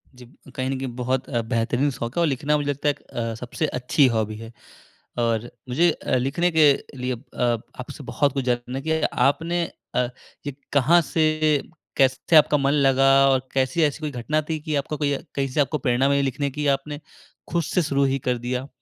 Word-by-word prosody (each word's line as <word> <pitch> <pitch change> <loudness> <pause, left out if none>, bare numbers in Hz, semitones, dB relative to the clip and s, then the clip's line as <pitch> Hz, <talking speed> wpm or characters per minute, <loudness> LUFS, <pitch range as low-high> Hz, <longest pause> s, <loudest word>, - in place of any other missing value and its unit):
जी। 125 -1 -13 0.3
कहीं 130 0 -2
न 135 - -1
कहीं 135 - -3
बहुत 130 +1 -2
अ, 120 -3 0
बेहतरीन 120 +5 +1
शौक़ 120 -1 -5
है, - - +3
और 165 - +3
लिखना 145 +2 +1
मुझे 145 -1 -2
लगता 145 +1 0
एक 145 - -2
अ, 115 -1 -4
सबसे 125 +7 -3
अच्छी 130 +2 +3
हॉबी 110 -1 -1
है। 115 +1 -9 0.7
और 115 0 0 0.2
मुझे 165 +7 +3
अ, 130 - -2
लिखने 140 +8 +1
के 155 -3 +6 0.2
लिए 125 0 -2
अ, 120 -1 -1 0.2
आपसे - - -9
बहुत 140 -2 +2
कुछ 135 -2 -2
जानना 125 +1 -2
कि 160 0 +1 0.3
आपने 170 +4 -1 0.3
अ, 125 - +2 0.4
ये 145 - -2 0.2
कहाँ 150 +5 +5
से 160 -1 +3 0.7
कैसे 135 +4 +3
आपका 150 0 +6
मन 140 +1 +1
लगा 135 -2 +3 0.2
और 130 0 0
कैसी 135 +5 +1
ऐसी 150 +1 +1
कोई 150 -1 -3
घटना 155 +6 0
थी 155 - 0
कि 150 0 -4
आपको 140 +2 -2
कोई 145 -1 0
अ, 140 - -2
कहीं 135 -1 -1
से 140 +3 0
आपको 150 +2 0
प्रेरणा 125 +2 +1
मिली 140 0 +2
लिखने 140 +1 -1
की, 150 +2 -3
या 140 - +5
आपने 145 +2 -4 0.5
खुद 170 0 0
से 180 +3 0
शुरू 140 -1 +1
ही 135 0 +1
कर 125 -1 +1
दिया? 125 +3 -4
135 Hz, 205 wpm, -23 LUFS, 125-150 Hz, 0.7 s, के